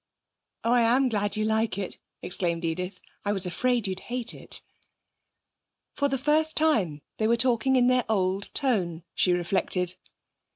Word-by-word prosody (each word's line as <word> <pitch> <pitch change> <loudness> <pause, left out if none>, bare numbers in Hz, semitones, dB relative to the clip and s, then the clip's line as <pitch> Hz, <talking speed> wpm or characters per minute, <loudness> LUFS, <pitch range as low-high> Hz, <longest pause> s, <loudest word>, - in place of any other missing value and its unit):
'Oh, 230 - +2
I 245 - +5
am 250 +3 +4
glad 205 -2 -1
you 215 - +1
like 220 -2 +1
it!' 195 -2 -5 0.2
exclaimed 170 -2 -1
Edith. 180 +3 -3 0.2
'I 205 - 0
was 195 -2 -1
afraid 240 +6 0
you'd 190 0 -3
hate 245 +1 -4
it.' - - -8 1.3
For 285 - +1
the 270 -1 -1
first 305 +4 +2
time 205 - +2 0.2
they 215 - +2
were 235 +1 +3
talking 255 +2 +3
in 250 -1 +5
their 255 -1 +3
old 195 -2 0
tone, 180 - +1
she 180 - +2
reflected. 180 0 0
215 Hz, 160 wpm, -27 LUFS, 185-250 Hz, 1.3 s, I